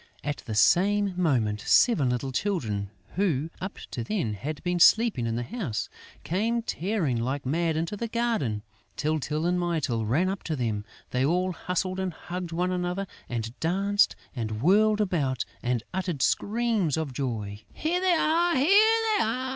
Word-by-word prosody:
At 145 -1 -2
the 110 - -3
same 200 - +4
moment, 120 -12 +1
seven 155 - +4
little 125 +2 -2
children, 115 - -1 0.3
who, 165 -6 +1
up 190 +2 -5
to 120 - -3
then, 120 - -1
had 145 +9 -5
been 175 -1 0
sleeping 220 - +5
in 115 - -1
the 120 - -2
house, 170 - -4 0.3
came 225 +7 0
tearing 175 - -1
like 135 +3 -2
mad 160 +3 0
into 165 +5 -2
the 230 +3 -3
garden. 220 - -1 0.3
Tyltyl 150 +1 -1
and 180 +1 +1
Mytyl 150 -11 -1
ran 155 +12 +2
up 195 +1 -2
to 160 - -1
them. 110 -6 -2 0.3
They 125 +1 +1
all 180 +6 +1
hustled 185 +2 -2
and 190 -2 -2
hugged 175 0 -6
one 180 +2 0
another 180 +2 -2 0.2
and 115 -1 -3
danced 195 +5 +2 0.2
and 110 -2 -3
whirled 210 +4 +4
about 150 - 0 0.2
and 120 -2 -1
uttered 180 -7 -1
screams 215 - +1
of 155 -5 -3
joy. 110 -6 -3
"Here 345 +3 -1
they 370 -1 +3
are, 340 +1 +2
here 270 +5 +2 0.5
they - - +3
are!" 230 +4 -1
170 Hz, 165 wpm, -27 LUFS, 125-200 Hz, 0.5 s, sleeping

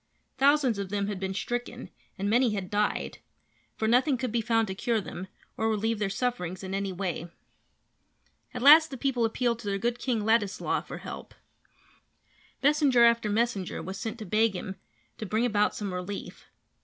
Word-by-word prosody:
Thousands 275 -5 +3
of 195 -1 -4
them 200 0 -1
had 200 -2 -4
been 190 0 -3
stricken 240 +4 -4 0.3
and 200 +1 -2
many 235 0 +3
had 190 -2 -5
died, 210 0 -1 0.6
for 220 - -1
nothing 255 +4 +3
could 255 -2 -3
be 235 0 +1
found 225 0 +2
to 190 - -3
cure 225 +3 0
them 190 -2 -7 0.3
or 220 0 +1
relieve 220 0 0
their 210 -2 0
sufferings 195 -5 -3
in 190 0 -5
any 195 0 -2
way. 180 -2 -4 1.2
At 250 -2 -5
last 310 +3 +9
the 265 - -7
people 250 -2 +1
appealed 235 +1 0
to 210 - -8
their 200 -1 0
good 240 +4 -1
King 235 -5 -1
Ladislaw 220 -3 +1
for - - -8
help. - - -9 1.3
Messenger 285 -4 +4
after 235 -2 +3
messenger 210 -3 -1
was 190 +1 -6
sent 225 +2 -4
to 220 - -7
beg 215 +2 +2
him 190 +1 -6 0.4
to 220 - -4
bring 220 +4 +1
about 210 -3 +1
some 200 -3 -4
relief. 180 +2 -6
220 Hz, 180 wpm, -28 LUFS, 195-240 Hz, 1.3 s, last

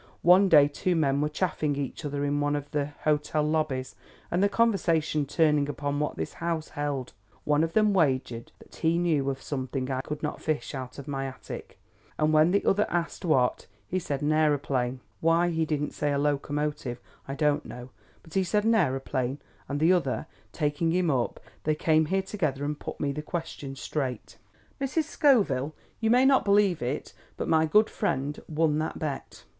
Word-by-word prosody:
One 185 +3 +6
day 145 -4 +7
two 175 +5 -1
men 140 -3 +2
were 150 - +1
chaffing 155 -3 -1
each 140 -2 -4
other 145 0 -2
in 145 0 0
one 145 0 +1
of 145 0 -5
the 145 -2 0 0.2
hotel 150 0 +1
lobbies, 150 -4 -1 0.4
and 175 - +1
the 200 - +4
conversation 170 -9 +1
turning 150 -1 +2
upon 145 0 -2
what 150 - -1
this 80 - -4
house 165 -2 -2
held, 145 -4 -3 0.3
one 150 +1 +2
of 165 0 -2
them 215 -1 +4
wagered 130 -9 0
that - - -16
he 165 +1 +2
knew 155 -6 +1
of 135 -1 -4
something 130 -1 -3
I 130 0 -1
could 150 +2 -6
not 150 - -3
fish 155 -1 -2
out 130 -2 -6
of 140 0 -8
my 135 -1 -2
attic, 130 - -9 0.4
and 155 0 +2
when 155 +2 +5
the 200 +2 +1
other 205 +2 +3
asked 170 -1 -2
what, 130 -7 +2 0.2
he 185 - -1
said 145 -5 -3
an 150 - +2
aeroplane 140 -5 +1 0.2
Why 165 +2 +3
he 160 -1 0
didn't 150 -1 -1
say 145 - -1
a 140 - +1
locomotive, 145 -3 -1 0.3
I 135 - -4
don't 150 0 +1
know; 125 +1 -9 0.3
but 160 - -16
he 190 - +2
said 210 +3 +1
an 225 +1 +3
aeroplane, 135 - 0 0.3
and 145 0 -2
the 165 +4 +5
other, 155 -5 0 0.3
taking 150 +1 0
him 175 -1 +2
up, 125 -3 -1 0.2
they 155 0 +1
came 155 0 +2
here 190 +3 +1
together 155 -9 -2
and 150 0 -3
put - - -7
me 145 - 0
the 150 +2 -4
question 150 -4 -5
straight. 130 -1 -4 0.4
Mrs. 275 +4 0
Scoville, 195 - +2 0.2
you 225 - +1
may 250 +3 +5
not 270 -1 +5
believe 200 -3 +3
it, 125 +4 -3 0.2
but - - -3
my 160 -1 +3
good 210 +7 +5
friend 145 -7 -2
won 155 -1 +1
that 155 - -3
bet. 145 -3 -5
150 Hz, 190 wpm, -27 LUFS, 140-170 Hz, 0.4 s, day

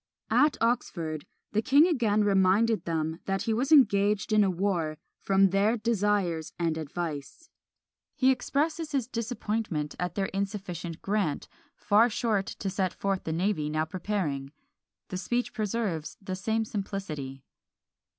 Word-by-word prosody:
At 295 -1 +4
Oxford 170 -10 -1 0.2
the 215 - +1
king 280 +7 +6
again 225 - +2
reminded 205 +3 +3
them 160 0 -2
that 195 0 -1
he 225 - 0
was 260 +7 -1
engaged 210 -7 +4
in 210 -1 +6
a 195 - +2
war 175 -4 -1 0.2
"from 195 -1 +3
their 205 +4 +3
desires 205 -7 0
and 165 -2 0
advice." 160 - -5 0.6
He 260 0 +4
expresses 305 +4 -1
his 260 -5 0
disappointment 220 - -2
at 180 -1 -2
their 195 - 0
insufficient 190 -4 -4
grant, 195 -7 -1 0.3
"far 220 +3 +4
short 215 -4 0
to 195 - -4
set 190 -1 -1
forth 195 -1 -2
the 160 - -2
navy 165 -2 0
now 155 +1 0
preparing." 160 -7 -3 0.6
The 185 - -3
speech 240 +6 -1
preserves 210 -7 -2
the 190 -2 -5
same 220 +4 -1
simplicity. 155 -11 -5
195 Hz, 140 wpm, -28 LUFS, 170-225 Hz, 0.6 s, king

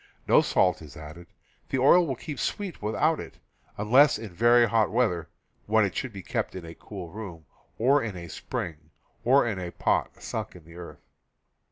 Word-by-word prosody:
No - - +6
salt 90 -3 +2
is 75 -4 -12
added; 80 +3 -10 0.4
the - - 0
oil 165 +7 +5
will 135 - -2
keep 145 +3 -7
sweet 200 -4 -3
without 105 +1 +1
it, - - -9 0.4
unless 125 +8 +5
in 110 -4 -8
very 120 +4 +5
hot 110 -1 +2
weather 105 -9 0 0.4
(when 110 0 +4
it 95 - -4
should 130 - -3
be 95 -3 -9
kept - - -3
in 90 -2 -7
a 80 - -9
cool 90 -2 -9
room, 95 -7 -8 0.3
or 135 +5 +4
in 105 -6 -4
a 85 -1 -8
spring, 75 -1 -6 0.3
or 130 +3 +5
in 105 -5 -2
a 90 -1 -4
pot - - -1
sunk - - -5
in 85 -3 -14
the 85 +1 -14
earth). 85 -1 -11
105 Hz, 190 wpm, -27 LUFS, 85-120 Hz, 0.4 s, No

